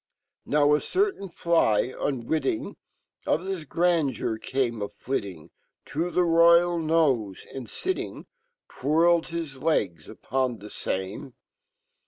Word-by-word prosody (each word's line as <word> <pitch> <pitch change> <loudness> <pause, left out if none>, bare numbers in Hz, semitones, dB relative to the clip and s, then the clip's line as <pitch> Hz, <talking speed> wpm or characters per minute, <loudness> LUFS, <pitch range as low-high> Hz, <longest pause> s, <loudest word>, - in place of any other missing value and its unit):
Now 145 0 +4
a 150 - +3
certain 380 - -1
fly, 165 - +2
unwitting 135 -1 -2 0.5
Of 155 - +2
fhis 185 -6 -5
grandeur, 160 -10 +1
came 120 -4 -1
a 100 - -2
flittlng 95 - -5 0.4
To 165 +4 0
fhe - - -12
Royal 170 +1 +5
nofe, 145 - +1
and 130 -4 -7
fitting', 375 0 -4 0.4
Twirled 165 +3 +2
his 160 -6 -5
legs 95 - 0
upon 130 -3 -2
the 105 0 -11
Tame. 95 +7 -4
145 Hz, 115 wpm, -26 LUFS, 115-170 Hz, 0.5 s, Royal